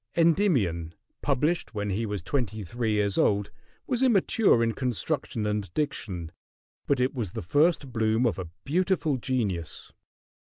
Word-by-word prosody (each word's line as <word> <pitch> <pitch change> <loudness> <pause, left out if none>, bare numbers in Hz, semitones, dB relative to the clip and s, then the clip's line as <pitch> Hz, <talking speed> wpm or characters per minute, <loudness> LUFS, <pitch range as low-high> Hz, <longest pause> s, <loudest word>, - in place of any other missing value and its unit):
"Endymion," 130 - +2 0.3
published 150 0 0
when 105 -1 -2
he 110 +4 -1
was 105 -4 -3
twenty 110 0 -2
three 110 +3 -1
years 100 -2 +1
old, 100 -1 +2 0.3
was 250 -2 -1
immature 215 - +4
in 115 - +2
construction 125 - -2
and 105 -3 -2
diction; 90 - -3 0.6
but 140 -2 +2
it 125 +1 +1
was 115 -9 -3
the - - -4
first 145 - +2
bloom 110 +1 +2
of 105 -6 0
a 90 -3 -5 0.2
beautiful 165 -2 +1
genius. 105 - -3
115 Hz, 140 wpm, -27 LUFS, 100-145 Hz, 0.6 s, immature